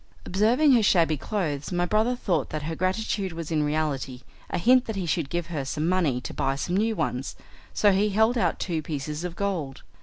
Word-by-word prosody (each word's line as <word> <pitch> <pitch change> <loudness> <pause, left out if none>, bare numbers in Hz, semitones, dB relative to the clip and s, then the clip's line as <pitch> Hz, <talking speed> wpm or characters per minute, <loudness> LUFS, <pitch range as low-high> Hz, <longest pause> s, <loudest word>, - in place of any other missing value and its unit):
Observing 230 +10 +3
her 245 -3 +5
shabby 170 -6 +3
clothes, 150 -3 -3
my 175 0 +1
brother 220 +6 +1
thought 185 -9 -1
that 155 -1 -4
her 160 +2 -3
gratitude 190 +1 -1
was 165 -1 -6
in 155 -2 +2
reality 145 -4 -2 0.3
a - - -2
hint 250 +7 +4
that 220 - -4
he 190 -2 -2
should 165 -3 -1
give 175 -1 -2
her 145 -3 -2
some 150 +4 -2
money 170 -9 +1
to 125 - -7
buy 135 - 0
some 175 +6 -2
new 220 +3 +1
ones, 130 -7 -2 0.4
so 205 - +3
he 200 +2 +2
held 220 +4 +3
out 235 - +1
two 165 -4 -2
pieces 150 +1 -4
of 180 -1 -4
gold. 175 -10 -3
175 Hz, 210 wpm, -26 LUFS, 150-210 Hz, 0.4 s, her